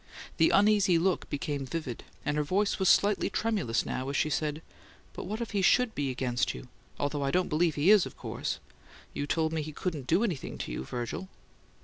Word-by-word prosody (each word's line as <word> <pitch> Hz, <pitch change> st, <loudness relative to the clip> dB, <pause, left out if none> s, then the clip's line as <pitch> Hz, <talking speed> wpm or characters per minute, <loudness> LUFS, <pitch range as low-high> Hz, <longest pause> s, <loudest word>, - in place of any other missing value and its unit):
The 160 Hz, -, +5 dB
uneasy 200 Hz, -3 st, +4 dB
look 180 Hz, +2 st, 0 dB
became 145 Hz, -1 st, -2 dB
vivid, 135 Hz, -3 st, -5 dB, 0.2 s
and 145 Hz, -, 0 dB
her 150 Hz, -, +2 dB
voice 195 Hz, +8 st, 0 dB
was 190 Hz, -, +3 dB
slightly 205 Hz, 0 st, +4 dB
tremulous 200 Hz, -, 0 dB
now, 130 Hz, +1 st, -3 dB
as 140 Hz, -, -1 dB
she 155 Hz, -, +1 dB
said, 150 Hz, +1 st, -1 dB, 0.5 s
"But -, -, -6 dB
what 215 Hz, +5 st, -4 dB
if 235 Hz, -, -4 dB
he 200 Hz, -2 st, +1 dB
SHOULD 235 Hz, +5 st, +4 dB
be 140 Hz, -2 st, -1 dB
against 125 Hz, -1 st, -1 dB
you 125 Hz, -, -10 dB, 0.3 s
although 145 Hz, 0 st, -1 dB
I 140 Hz, -, 0 dB
don't 180 Hz, +5 st, +1 dB
believe 160 Hz, +1 st, +2 dB
he 150 Hz, +7 st, +4 dB
is, 210 Hz, -4 st, +6 dB
of -, -, -13 dB
course -, -, -3 dB, 0.6 s
you 145 Hz, -, -3 dB
told 160 Hz, +1 st, 0 dB
me 160 Hz, -, 0 dB
he 155 Hz, +1 st, -5 dB
couldn't 150 Hz, -4 st, -4 dB
DO 175 Hz, +7 st, +3 dB
anything 175 Hz, -, -3 dB
to -, -, -5 dB
you, -, -, -4 dB
Virgil." 120 Hz, -, -5 dB
160 Hz, 210 wpm, -29 LUFS, 145-190 Hz, 0.6 s, is